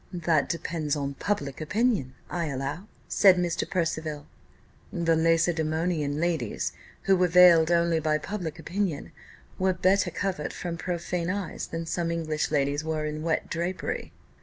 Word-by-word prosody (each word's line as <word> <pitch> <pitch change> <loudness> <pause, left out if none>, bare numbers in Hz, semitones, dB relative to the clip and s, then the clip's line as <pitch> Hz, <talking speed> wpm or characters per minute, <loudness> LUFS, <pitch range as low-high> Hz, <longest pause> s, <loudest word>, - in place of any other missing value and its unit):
"That 165 -4 +1
depends 165 -3 -2
on 140 -1 -3
public 145 -5 -3
opinion, 200 - 0
I 170 -2 -2
allow," 140 +7 -4 0.2
said 190 -3 +5
Mr. 175 -1 -1
Percival. 160 -4 -2 0.7
"The 165 -1 +1
Lacedaemonian 160 -2 +1
ladies, 160 -10 -1 0.3
who 195 - +4
were 180 -1 +3
veiled 170 -2 +7
only 170 -1 +3
by 155 -1 +1
public 175 -3 -5
opinion, 175 -1 -3 0.5
were 185 0 +2
better 185 +2 +2
covered 185 -6 -3
from 175 -2 -4
profane 175 0 -3
eyes 200 -1 -3
than 165 0 -4
some 170 0 -1
English 160 -2 -1
ladies 145 0 0
are 155 -1 -2
in 150 0 -4
wet 165 0 -1
drapery." 175 +2 -3
165 Hz, 140 wpm, -27 LUFS, 155-180 Hz, 0.7 s, veiled